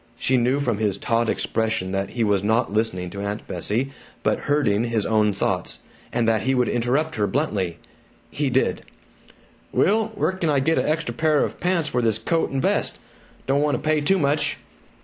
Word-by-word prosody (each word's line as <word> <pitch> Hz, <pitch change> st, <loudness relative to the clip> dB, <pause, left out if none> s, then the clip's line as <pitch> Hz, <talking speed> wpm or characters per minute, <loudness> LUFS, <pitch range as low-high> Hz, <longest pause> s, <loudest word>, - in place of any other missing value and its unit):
She 130 Hz, -, +1 dB
knew 125 Hz, +3 st, +2 dB
from 120 Hz, -7 st, -1 dB
his 105 Hz, -3 st, 0 dB
taut 115 Hz, +2 st, 0 dB
expression 110 Hz, -4 st, -1 dB
that 95 Hz, 0 st, -1 dB
he 120 Hz, -, -1 dB
was 100 Hz, -2 st, +2 dB
not 110 Hz, 0 st, +1 dB
listening 90 Hz, -5 st, -1 dB
to 100 Hz, -, -6 dB
Aunt 100 Hz, +1 st, -4 dB
Bessie 110 Hz, +9 st, -2 dB, 0.3 s
but -, -, +1 dB
herding 120 Hz, -7 st, +2 dB
his 115 Hz, -3 st, 0 dB
own 105 Hz, -1 st, +3 dB
thoughts, 100 Hz, -, -1 dB, 0.3 s
and 120 Hz, -1 st, 0 dB
that 110 Hz, -1 st, +2 dB
he 130 Hz, 0 st, +1 dB
would 125 Hz, -1 st, +2 dB
interrupt 135 Hz, +6 st, 0 dB
her 105 Hz, -1 st, +1 dB
bluntly. 100 Hz, -, -1 dB, 0.5 s
He 145 Hz, -2 st, -1 dB
did: 130 Hz, +1 st, +1 dB, 0.9 s
"Will, 215 Hz, +2 st, +2 dB
where -, -, +1 dB
c'n 185 Hz, -4 st, -2 dB
I 145 Hz, -2 st, +3 dB
get 160 Hz, +5 st, +2 dB
an -, -, 0 dB
extra 155 Hz, -6 st, -1 dB
pair 155 Hz, +3 st, +2 dB
of -, -, -4 dB
pants 175 Hz, -3 st, +1 dB
for 125 Hz, -3 st, 0 dB
this 110 Hz, -2 st, +2 dB
coat 165 Hz, +9 st, 0 dB
and 135 Hz, -, -2 dB
vest? -, -, +1 dB, 0.5 s
D' -, -, -1 dB
want 145 Hz, +1 st, +2 dB
to -, -, -3 dB
pay 155 Hz, -1 st, +3 dB
too 190 Hz, +7 st, +3 dB
much." 145 Hz, -2 st, +1 dB
120 Hz, 195 wpm, -23 LUFS, 105-145 Hz, 0.9 s, own